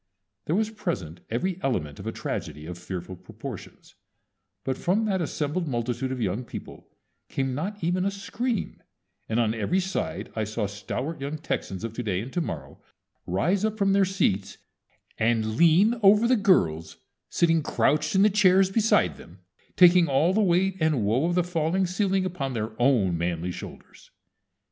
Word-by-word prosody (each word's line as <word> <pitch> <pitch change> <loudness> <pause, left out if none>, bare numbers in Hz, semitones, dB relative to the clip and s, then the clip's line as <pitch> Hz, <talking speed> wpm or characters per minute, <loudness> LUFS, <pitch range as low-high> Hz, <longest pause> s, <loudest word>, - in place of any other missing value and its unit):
There 160 - 0
was 220 +2 0
present 95 - -4
every 175 +11 -2
element 75 - -2
of - - -7
a - - -1
tragedy 75 - -5
of 85 +1 -7
fearful 90 0 -6
proportions; 90 - -10 0.7
but 130 - -1
from 195 - 0
that 195 -4 0
assembled 155 +2 -2
multitude 120 0 -2
of 130 - -3
young 105 +2 -1
people - - -9 0.4
came 135 -1 -1
not 185 +8 -4
even 180 +2 +1
a 195 - +1
scream, 220 +4 -3 0.5
and 110 +1 +1
on 110 -2 +2
every 115 - 0
side 190 0 -3
I 110 - 0
saw 110 +1 -2
stalwart 125 +10 -5
young 140 +3 -3
Texans 100 - -4
of 115 -1 -4
To 125 - -4
day 100 -6 -1
and 120 +6 -7
To 175 - 0
morrow 70 - -6 0.5
rise 170 - +1
up 220 0 0
from 195 -2 +2
their 200 0 +4
seats, 100 - -1 0.6
and 115 0 +2
_lean 170 - +4
over 210 +3 +6
the 255 - +4
girls 85 - +2 0.3
sitting 165 -1 +2
crouched 150 +3 +1
in 190 - +5
the 210 - +5
chairs 190 -1 +4
beside 220 +1 +2
them, - - -15 0.3
taking 180 -1 +6
all 145 +6 +2
the 215 - +2
weight 190 0 +2
and 155 -9 +1
woe 125 +10 +2
of 175 - 0
that 180 - +3
falling 175 +2 0
ceiling 190 +1 0
upon 140 -8 -3
their 110 -1 -3
own 105 -10 +3
manly 85 +1 -2
shoulders_! - - -11
155 Hz, 170 wpm, -26 LUFS, -, 0.7 s, over